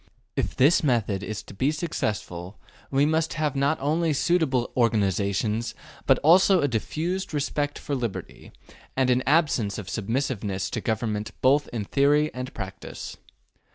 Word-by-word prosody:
If - - -1
this 145 +6 +4
method 110 -8 +1
is 105 0 -5
to - - -12
be 130 +9 +1
successful 105 - -3 0.3
we 140 +1 +3
must 160 +1 +1
have 150 -3 -1
not 140 +3 +2
only 155 +3 +1
suitable 140 -6 +1
organizations 105 -1 +1 0.3
but - - +6
also 185 +4 +6
a 145 - +2
diffused 160 - -2
respect 145 0 -1
for 145 - -5
liberty, 120 -6 -5 0.5
and 130 -1 +3
an 125 +1 +3
absence 140 - +2
of 100 -3 -6
submissiveness 105 -4 -2
to - - -2
government 110 -2 -2
both 140 +3 +4
in 110 -4 -3
theory 145 +5 +2
and 125 0 -5
practice. - - -7
130 Hz, 145 wpm, -25 LUFS, 110-150 Hz, 0.5 s, but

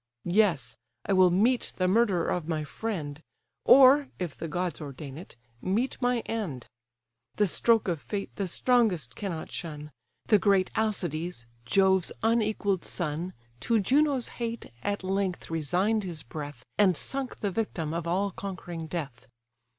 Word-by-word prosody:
Yes—I 125 - 0
will 185 -1 +6
meet 225 +8 +2
the 185 - +2
murderer 195 -3 +3
of 170 -3 -1
my 155 -2 -1
friend; 150 -4 -4 0.4
Or 275 +2 +8
(if 175 -6 -4
the 165 - -5
gods 175 0 -2
ordain 140 -1 -7
it) 170 +5 -10 0.3
meet 225 +10 -1
my 245 -1 +2
end. 185 - -4 0.7
The 210 - +3
stroke 225 +4 +2
of 170 -5 -1
fate 200 -2 -5
the 195 - -2
strongest 180 - +2
cannot 180 -6 -5
shun: 150 -2 -6 0.3
The 210 - +5
great 195 -2 +3
Alcides, 175 - -2 0.2
Jove's 190 +5 +3
unequall'd 215 -4 +1
son, 170 +2 -3 0.3
To 230 - +2
Juno's 275 +4 +2
hate, 230 - -4
at 205 -1 -2
length 190 -2 -2
resign'd 180 +8 +1
his 170 -5 -5
breath, 145 +3 -8
And 190 -5 +5
sunk 270 -2 -3
the 205 - 0
victim 175 -7 -2
of 170 0 -3
all 195 +4 +1
conquering 175 -4 -6
death. 140 -7 -5
185 Hz, 145 wpm, -28 LUFS, 160-215 Hz, 0.7 s, Or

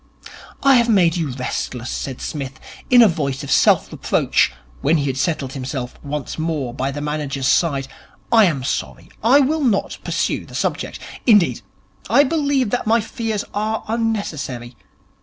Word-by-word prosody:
'I 275 -2 +6
have 235 0 +2
made 180 -6 +4
you 165 -4 -1
restless,' 125 -1 -4
said 130 -2 -5
Psmith, 135 -3 -5 0.3
in 245 -1 +8
a - - +7
voice 145 -6 -2
of 140 - -5
self - - +4
reproach, - - +1 0.3
when 155 +4 +3
he 145 - -1
had 135 -2 -1
settled 135 -2 -1
himself 130 -2 -5
once 145 0 -5
more 155 -6 -2
by 130 +1 -2
the 145 +1 -5
manager's 145 -3 -2
side. 140 -2 +2 0.4
'I 225 -2 +7
am 145 -8 0
sorry. 135 - -4
I 255 +6 +6
will 300 +3 +1
not 225 -7 0
pursue - - -1
the - - -11
subject. - - -2 0.3
Indeed, 210 -7 +4 0.5
I 285 - +6
believe 285 -5 +1
that 245 -2 -1
my 230 +2 +4
fears 225 -1 -3
are 215 +2 -1
unnecessary. 160 - -3
160 Hz, 160 wpm, -20 LUFS, 135-225 Hz, 0.5 s, in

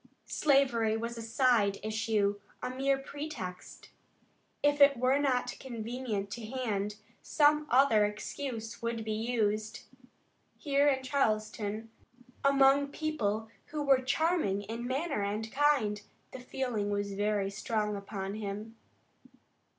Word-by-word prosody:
Slavery 260 -7 +2
was 235 +1 -4
a 230 - -6
side 225 -3 +2
issue, 215 -2 0 0.2
a - - -2
mere 270 +1 +1
pretext. 270 -10 -7 0.7
If 290 0 +3
it 280 -1 +7
were 255 +3 +3
not 265 -3 0
convenient 230 -4 -4
to 235 - -5
hand, 215 -4 -2 0.3
some 300 0 +3
other 245 -4 +5
excuse 225 +2 -4
would 230 -1 -2
be 220 - -2
used. 215 -1 -1 0.7
Here 285 -1 +2
in 265 -2 +2
Charleston, 215 -6 0
the - - -4
first 225 0 -12 0.6
home 275 0 +1
of - - +9
secession, 270 - +8
among 280 0 -1
people 225 -9 -2 0.2
who 300 -1 -3
were 270 -2 +4
charming 270 - +1
in 230 +4 -5
manner 275 -1 -1
and 210 +2 -2
kind, 265 -8 +2 0.3
the 260 - -8
feeling 245 -5 -2
was 205 0 -2
very 205 -1 0
strong 210 0 -1
upon 200 -1 -5
him. 215 +2 -6
230 Hz, 135 wpm, -31 LUFS, 210-270 Hz, 0.7 s, of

